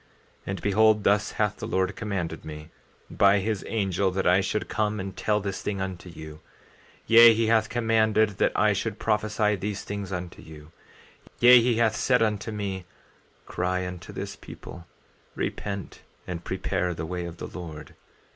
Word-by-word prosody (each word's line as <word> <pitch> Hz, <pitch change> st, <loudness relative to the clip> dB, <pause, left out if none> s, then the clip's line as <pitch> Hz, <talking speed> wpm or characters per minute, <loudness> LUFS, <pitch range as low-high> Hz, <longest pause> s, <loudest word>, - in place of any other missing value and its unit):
14:9 -, -, -33 dB, 0.4 s
And 95 Hz, -2 st, -4 dB
behold, 105 Hz, +1 st, +4 dB
thus 105 Hz, +1 st, +2 dB
hath 105 Hz, -1 st, 0 dB
the -, -, -6 dB
Lord 95 Hz, +1 st, 0 dB
commanded 95 Hz, -7 st, -4 dB
me, 75 Hz, +1 st, -9 dB, 0.4 s
by 100 Hz, 0 st, +4 dB
his 105 Hz, 0 st, -2 dB
angel, 100 Hz, -3 st, 0 dB
that 95 Hz, +1 st, -2 dB
I 90 Hz, +2 st, +4 dB
should 105 Hz, +2 st, -2 dB
come 105 Hz, -1 st, -1 dB
and 95 Hz, 0 st, -5 dB
tell 105 Hz, -1 st, 0 dB
this 100 Hz, -1 st, -4 dB
thing 100 Hz, -2 st, -3 dB
unto 95 Hz, -2 st, -5 dB
you; 80 Hz, -2 st, -10 dB, 0.7 s
yea, 115 Hz, 0 st, +8 dB
he 115 Hz, +1 st, +1 dB
hath 110 Hz, -1 st, +2 dB
commanded 110 Hz, -3 st, +2 dB
that -, -, +3 dB
I -, -, +3 dB
should -, -, -3 dB
prophesy 105 Hz, -1 st, +1 dB
these 100 Hz, +1 st, -4 dB
things 100 Hz, -1 st, -5 dB
unto 90 Hz, -2 st, -6 dB
you; 75 Hz, 0 st, -13 dB, 0.7 s
yea, 125 Hz, 0 st, +8 dB
he 120 Hz, 0 st, +2 dB
hath 110 Hz, -1 st, +2 dB
said 125 Hz, +2 st, +2 dB
unto 105 Hz, 0 st, -1 dB
me: 100 Hz, -3 st, -4 dB, 0.6 s
Cry 90 Hz, +1 st, -2 dB
unto 90 Hz, -1 st, -8 dB
this -, -, -6 dB
people, 85 Hz, -1 st, -11 dB, 0.5 s
repent 100 Hz, -3 st, -4 dB, 0.2 s
and 85 Hz, -1 st, -6 dB
prepare 90 Hz, -1 st, -2 dB
the 80 Hz, -, -4 dB
way 90 Hz, +1 st, -4 dB
of 85 Hz, -1 st, -8 dB
the -, -, -6 dB
Lord. 80 Hz, -4 st, -9 dB
100 Hz, 170 wpm, -26 LUFS, 90-110 Hz, 0.7 s, yea